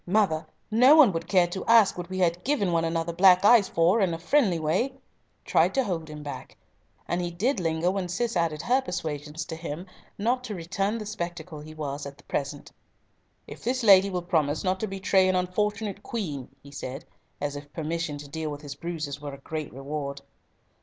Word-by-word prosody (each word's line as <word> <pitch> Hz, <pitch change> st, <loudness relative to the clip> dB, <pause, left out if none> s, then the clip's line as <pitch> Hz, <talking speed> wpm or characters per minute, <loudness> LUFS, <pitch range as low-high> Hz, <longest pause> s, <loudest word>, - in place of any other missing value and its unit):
—Mother, 185 Hz, -5 st, +2 dB, 0.2 s
no 250 Hz, +7 st, +7 dB
one 300 Hz, -9 st, +7 dB
would 165 Hz, -1 st, -4 dB
care 180 Hz, -2 st, +4 dB
to 175 Hz, +2 st, -5 dB
ask 230 Hz, -3 st, +6 dB
what 175 Hz, 0 st, -6 dB
we 185 Hz, -, -4 dB
had 175 Hz, -1 st, +1 dB
given 250 Hz, -10 st, +1 dB
one 165 Hz, -1 st, +2 dB
another 165 Hz, 0 st, -1 dB
black 185 Hz, +2 st, +6 dB
eyes 215 Hz, -3 st, +7 dB
for 175 Hz, +7 st, +3 dB
in 180 Hz, -4 st, +1 dB
a -, -, -5 dB
friendly 195 Hz, -, +2 dB
way," 175 Hz, -, 0 dB, 0.5 s
tried -, -, +3 dB
to 265 Hz, -, +3 dB
hold 170 Hz, -7 st, -3 dB
him 150 Hz, -1 st, -8 dB
back, 145 Hz, -, -8 dB, 0.5 s
and 175 Hz, +1 st, -1 dB
he 175 Hz, -, -2 dB
did 210 Hz, +8 st, 0 dB
linger 165 Hz, +1 st, +1 dB
when 190 Hz, -2 st, -3 dB
Cis 235 Hz, +5 st, -1 dB
added 165 Hz, -3 st, 0 dB
her 255 Hz, +2 st, +3 dB
persuasions 150 Hz, -, -4 dB
to 160 Hz, -, -6 dB
him 165 Hz, +1 st, -6 dB, 0.3 s
not 245 Hz, +5 st, 0 dB
to 215 Hz, -, -5 dB
return 195 Hz, +5 st, -2 dB
the 215 Hz, -, -6 dB
spectacle 175 Hz, -5 st, -5 dB
he 155 Hz, +1 st, -10 dB
was 145 Hz, -2 st, -4 dB
at 140 Hz, 0 st, -13 dB
present. 140 Hz, 0 st, -4 dB, 0.7 s
"If -, -, -11 dB
this 255 Hz, +1 st, -1 dB
lady 195 Hz, -2 st, +7 dB
will 180 Hz, -2 st, -3 dB
promise 155 Hz, -4 st, 0 dB
not 185 Hz, 0 st, 0 dB
to 220 Hz, -, -2 dB
betray 190 Hz, -1 st, +2 dB
an 185 Hz, -, +2 dB
unfortunate 205 Hz, +2 st, -1 dB
Queen," 155 Hz, -, -4 dB, 0.2 s
he 140 Hz, -, -13 dB
said, 135 Hz, 0 st, -6 dB, 0.3 s
as 145 Hz, 0 st, -3 dB
if 145 Hz, 0 st, -9 dB
permission 160 Hz, -1 st, -3 dB
to 145 Hz, 0 st, -9 dB
deal 160 Hz, +2 st, -4 dB
with 145 Hz, 0 st, -6 dB
his 145 Hz, -2 st, -7 dB
bruises 150 Hz, -2 st, -5 dB
were 145 Hz, -1 st, -6 dB
a -, -, -13 dB
great 155 Hz, +2 st, -5 dB
reward. 140 Hz, +1 st, -5 dB
175 Hz, 200 wpm, -27 LUFS, 155-200 Hz, 0.7 s, no